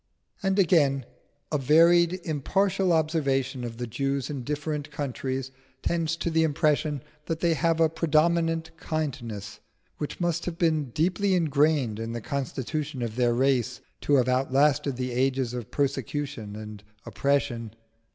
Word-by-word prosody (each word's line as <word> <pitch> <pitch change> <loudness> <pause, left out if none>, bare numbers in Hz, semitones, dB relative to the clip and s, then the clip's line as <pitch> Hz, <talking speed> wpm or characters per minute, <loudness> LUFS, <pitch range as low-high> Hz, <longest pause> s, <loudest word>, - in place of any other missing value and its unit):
And 195 -1 +1
again, 145 -8 +3 0.5
a 150 - +1
varied, 170 +5 +5
impartial 185 +5 +1
observation 140 -5 +1
of 115 -1 -6
the 120 - -3
Jews 135 +3 -2
in 135 -4 -4
different 150 +2 -3
countries 135 -2 -3 0.3
tends 165 -1 0
to 170 +1 -2
the 160 0 +3
impression 150 -2 +1 0.2
that 165 -1 -2
they 170 -1 +3
have 165 +2 +1
a 165 - +6
predominant 165 +1 +1
kindliness 120 -10 -4 0.4
which 150 - -4
must 175 -2 0
have 170 -1 -3
been 160 -4 +2
deeply 175 - +1
ingrained 145 -8 +2
in 115 +1 -4
the 120 - -3
constitution 140 +1 -3
of 115 -2 -4
their 120 -1 +2
race 130 -2 +1 0.2
to 145 - +3
have 130 -2 +3
outlasted 135 +2 +2
the 125 0 -3
ages 130 0 0
of 120 -4 -5
persecution 135 -5 -2
and 105 -1 -8 0.2
oppression. 125 -6 -1
145 Hz, 140 wpm, -27 LUFS, 130-160 Hz, 0.5 s, a